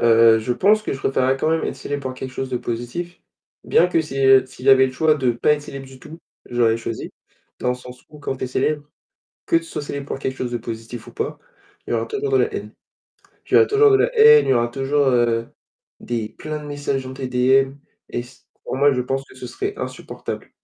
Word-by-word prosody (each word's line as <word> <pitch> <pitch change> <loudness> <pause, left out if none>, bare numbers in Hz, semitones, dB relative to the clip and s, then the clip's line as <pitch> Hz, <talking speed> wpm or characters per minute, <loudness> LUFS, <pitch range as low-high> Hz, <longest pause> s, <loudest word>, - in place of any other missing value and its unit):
heu, 115 -1 +6
je 120 +3 -1
pense 210 - +3
que - - -3
je 135 - -5
préférerais 135 0 +1
quand 155 - 0
même 165 0 +1
être - - -3
célèbre 145 0 -5
pour 130 -1 -4
quelque 130 0 -6
chose 135 0 -4
de 125 - 0
positif. 120 +11 -5 0.4
Bien 180 - +4
que 165 - +2
si, 150 -4 -6
heu, 135 0 +6
s'il 130 0 -11
y - - +4
avait 130 0 +7
le 130 - -6
choix 155 +2 +2
de 130 -4 +1
pas 120 +6 +2
être 145 - -7
célèbre 135 -1 -8
du 130 0 -14
tout, 160 +6 -12 0.3
je 120 - -8
l'aurais 115 -1 +4
choisi 115 0 -5 0.5
dans 125 - 0
le - - 0
sens 125 0 -12
où 150 -1 -14
quand 135 - -3
tu 130 - -4
es - - -3
célèbre, 145 +3 -1 0.6
que 165 - +3
tu 165 - -3
sois 165 - -6
célèbre 140 -1 -5
pour - - -4
quelque 130 -1 -3
chose 125 -1 -3
de 120 - -1
positif 115 +1 -7
ou - - -10
pas, 440 +1 -4 0.5
il - - -4
y - - +1
aura - - 0
toujours 420 -1 -3
de 405 - +4
la - - +1
haine. - - -6 0.8
Il - - -10
y - - +9
aura 445 - +6
toujours 425 0 +5
de 400 - +6
la - - +1
haine, 450 0 +8
il - - +1
y - - +5
aura 120 0 +2
toujours, 135 +3 +1
heu, 120 -2 +2 0.5
des 115 -3 -3
plein 155 0 -6
de 150 - -10
messages 145 -2 -3
dans 130 - -7
tes 130 -1 -5
DM 130 +2 +3 0.3
et 120 - -3
c 125 +2 -17 0.2
pour - - -4
moi, 145 +1 +4
je 125 - 0
pense 135 +2 -2
que - - -16
ce - - -7
serait 395 +1 -4
insupportable. - - -6
135 Hz, 255 wpm, -21 LUFS, 125-150 Hz, 0.8 s, y